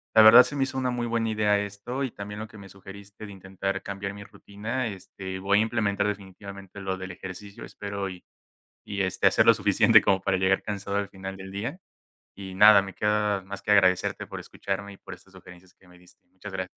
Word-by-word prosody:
la 110 - +9
verdad 110 +3 +10
se 145 - -6
me 135 - +1
hizo 135 0 -4
una 130 -1 0
muy 120 -1 -2
buena 115 -1 -1
idea 105 -1 +2
esto 100 +7 -5
y 130 - -3
también 105 +1 -8
lo 110 - -6
que 110 - -15
me 100 -1 -11
sugeriste 100 +2 -12
de 100 - -10
intentar 95 0 -4
cambiar 100 0 -5
mi 100 - -9
rutina, 110 +6 -5
este, 95 -1 -7
voy 100 +2 +2
a - - +4
implementar 105 -3 0
definitivamente 100 0 -8
lo 95 -1 -3
del 95 0 -7
ejercicio, 95 +3 -9
espero 100 -1 -5
y 90 -1 -11 0.6
y 100 -1 -3
este, 95 -1 -1
hacer - - +4
lo - - +9
suficiente - - +5
como 95 -1 +2
para 95 -1 +1
llegar 95 +1 +2
cansado 100 -1 -4
al 100 -1 -2
final 95 0 -8
del 95 0 -9
día, 120 - -5 0.6
y 95 -1 -8
nada, 105 0 +8
me 95 -2 -8
queda 105 -2 +1
más 100 +1 -8
que 105 - -9
agradecerte 95 -2 +3
por - - -7
escucharme 100 +1 -5
y - - -15
por - - -10
estas - - -17
sugerencias 90 +1 -15
que 95 - -24
me 90 0 -18
diste. 90 - -22
Muchas 95 +2 -11
gra 95 0 -2
100 Hz, 220 wpm, -26 LUFS, 95-105 Hz, 0.6 s, verdad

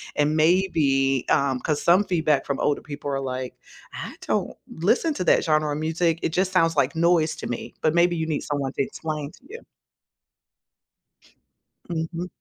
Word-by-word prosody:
and 150 +1 +2
maybe 150 -6 +2
um, 135 -2 +2
'cause 150 -2 -1
some 180 +4 +5
feedback 160 -6 +1
from 140 - -2
older 145 - +1
people 145 -1 -7
are 135 -1 -1
like, 130 -1 -4 0.4
"I - - -6
don't - - 0 0.2
listen 240 - +1
to 180 - -2
that - - +4
genre 155 -1 +1
of 150 - -3
music, 165 +1 0
it - - 0
just 185 +3 0
sounds 165 -3 +3
like 140 +3 +1
noise 165 -1 +2
to - - -5
me," 120 - -5
but 155 +1 +1
maybe 175 0 +4
you 160 -1 -2
need 155 - -1
someone 145 -2 -2
to - - +1
explain 150 0 -5
to - - -19
you. 460 +3 -9 2.3
Mhm. 170 +1 -3
155 Hz, 175 wpm, -24 LUFS, 145-170 Hz, 2.3 s, some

